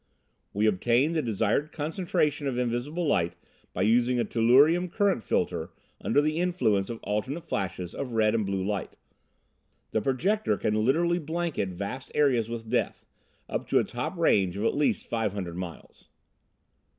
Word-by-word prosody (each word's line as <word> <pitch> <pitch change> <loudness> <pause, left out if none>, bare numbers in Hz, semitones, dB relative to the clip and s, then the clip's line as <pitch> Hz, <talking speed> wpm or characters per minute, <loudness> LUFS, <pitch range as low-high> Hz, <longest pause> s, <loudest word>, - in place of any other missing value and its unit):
"We 105 +2 0
obtain 120 - +2
the 160 - +1
desired 115 +5 0
concentration 150 -2 -1
of 130 -3 -2
invisible 125 +8 -1
light 85 - +1 0.4
by 95 - -1
using 120 +3 +3
a - - +1
tellurium 145 +10 +4
current 200 - +1
filter - - -1 0.3
under 145 - +3
the 155 +2 0
influence 140 - +1
of 115 -1 -5
alternate 130 +11 -2
flashes 90 -2 -3
of 130 -4 -5
red 110 -1 +3
and 115 -2 +1
blue 95 -1 -2
light. 100 0 -3 1.0
The 110 - +1
projector 135 - +1
can 105 - 0
literally 170 +8 +2
blanket 160 - -2
vast 100 +8 -6
areas 125 -7 +2
with 115 -1 -5
death, - - -1 0.4
up - - -3
to - - +2
a - - +4
top - - -4
range 95 -2 +2
of 105 - -2
at - - +2
least 145 0 0
five 110 -4 -1
hundred 90 -4 -5
miles. 90 -2 -9
120 Hz, 160 wpm, -27 LUFS, 105-150 Hz, 1.0 s, tellurium